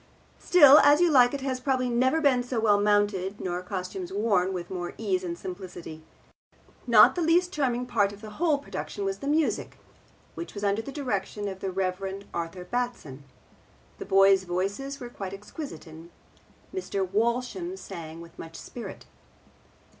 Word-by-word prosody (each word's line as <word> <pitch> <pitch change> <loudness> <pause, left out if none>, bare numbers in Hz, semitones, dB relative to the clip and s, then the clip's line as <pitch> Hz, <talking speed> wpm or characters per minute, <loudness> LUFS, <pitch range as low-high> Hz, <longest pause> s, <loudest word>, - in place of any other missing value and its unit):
Still, 295 -5 +8
As 290 +1 +6
You 350 -1 +4
Like 250 -3 +6
It 280 - -5
has 260 -1 -2
probably 255 -1 0
never 255 +6 +2
been 270 -5 +3
so 245 -1 -3
well 205 -2 +3
mounted, 205 -2 +1
nor 180 -1 -3
costumes 185 -1 -5
worn 195 -2 +1
with 175 -1 -5
more 175 -2 -5
ease 190 -4 -1
and 170 -1 -4
simplicity. 180 -4 -8 0.9
Not 230 -3 +7
the 355 - -2
least 350 +2 +2
charming 250 -4 0
part 205 -5 +1
of 205 - -12
the 215 -1 -9
whole 320 -4 +3
production 210 -7 -6
was 195 0 -2
the 280 - -6
music, 305 +2 0 0.6
which 340 - -8
was 200 - -6
under 200 +2 +1
the 250 - -8
direction 210 -7 -3
of 190 -1 -6
the 195 - -3
Rev. 190 +1 -3
Arthur 170 +2 -5
Batson. 180 - -4 0.7
The - - -6
boys' 195 0 +5
voices 200 +10 -3
were 245 - -6
quite 195 -5 -7
exquisite, 210 +9 -8
and 160 +1 -12 0.6
Mr. 200 - -2
Walsham 245 - -1
sang 165 - -8
with 170 0 -14
much 165 0 -9
spirit. 240 +7 -9
205 Hz, 165 wpm, -27 LUFS, 185-255 Hz, 0.9 s, Still